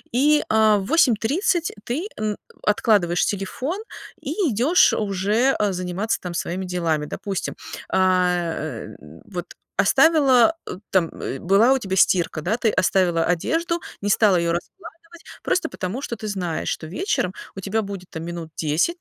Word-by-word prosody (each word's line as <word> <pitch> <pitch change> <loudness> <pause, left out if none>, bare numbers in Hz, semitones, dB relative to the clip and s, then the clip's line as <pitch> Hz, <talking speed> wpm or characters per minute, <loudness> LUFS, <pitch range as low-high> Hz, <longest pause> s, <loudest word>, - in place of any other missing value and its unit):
и, 295 +4 +4
а, 215 -1 +4
в 195 - -3
8:30 310 - +2
ты, 300 +11 -3
м, 215 -1 -2 0.3
откладываешь 205 -5 +2
телефон 250 - -3 0.4
и 275 - -5 0.2
идёшь 260 - +4
уже, 210 +6 +1
э, 205 -2 +1
заниматься 185 +4 -2
там 180 -1 -6
своими 180 +2 -3
делами. 170 -4 -1
Допустим, 195 +5 -4 0.3
а, 180 -2 +2
э, - - -6 0.3
вот 175 -2 -6 0.3
оставила 305 -3 +5 0.3
там 175 -4 +1 0.3
была 200 - +4
у - - +2
тебя 195 -7 -3
стирка, 175 -4 +2
да, 190 +9 0
ты 225 -3 +1
оставила 180 -4 +2
одежду, 330 - 0 0.2
не 205 - -1
стала 205 -2 +4
её 170 -1 +1
раскладывать, 335 - -9 0.2
просто 360 -3 0
потому 195 +8 -4
что 235 - -3
ты 215 -1 -7
знаешь, 180 -6 -3
что - - -8
вечером 185 - -1 0.2
у - - -6
тебя 200 +3 -1
будет 195 -3 -7
там 160 - -6 0.3
10 160 - +1
200 Hz, 145 wpm, -22 LUFS, 180-255 Hz, 0.4 s, оставила